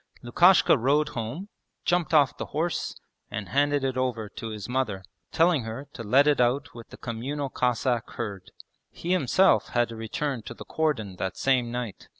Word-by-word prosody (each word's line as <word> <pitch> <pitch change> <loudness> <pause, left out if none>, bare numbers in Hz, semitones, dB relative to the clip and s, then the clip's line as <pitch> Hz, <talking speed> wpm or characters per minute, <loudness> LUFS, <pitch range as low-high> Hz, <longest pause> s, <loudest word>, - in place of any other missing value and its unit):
Lukashka 175 +12 +5
rode 145 +5 +2
home, 125 - -5 0.4
jumped 175 -1 +1
off 145 -6 +4
the - - -6
horse, 170 +2 -1 0.3
and 100 -1 -5
handed 145 +1 +2
it 130 -1 -1
over 120 -5 -1
to 115 - -7
his 105 -2 -6
mother, 125 -7 -2 0.3
telling 165 -3 +3
her 115 +5 -6
to - - -8
let 130 +6 +4
it 145 -4 +3
out 130 +4 +1
with 115 -1 -11
the - - -11
communal 135 +5 -4
Cossack 125 -1 0
herd. 100 -5 -5 0.4
He 175 - -5
himself 185 +2 +3
had 120 -1 +3
to 115 - -7
return 125 +4 -3
to - - -7
the - - -10
cordon 115 -12 -1
that 95 0 -3
same 125 -3 +1
night. 120 -4 -5
125 Hz, 175 wpm, -26 LUFS, 115-145 Hz, 0.4 s, Lukashka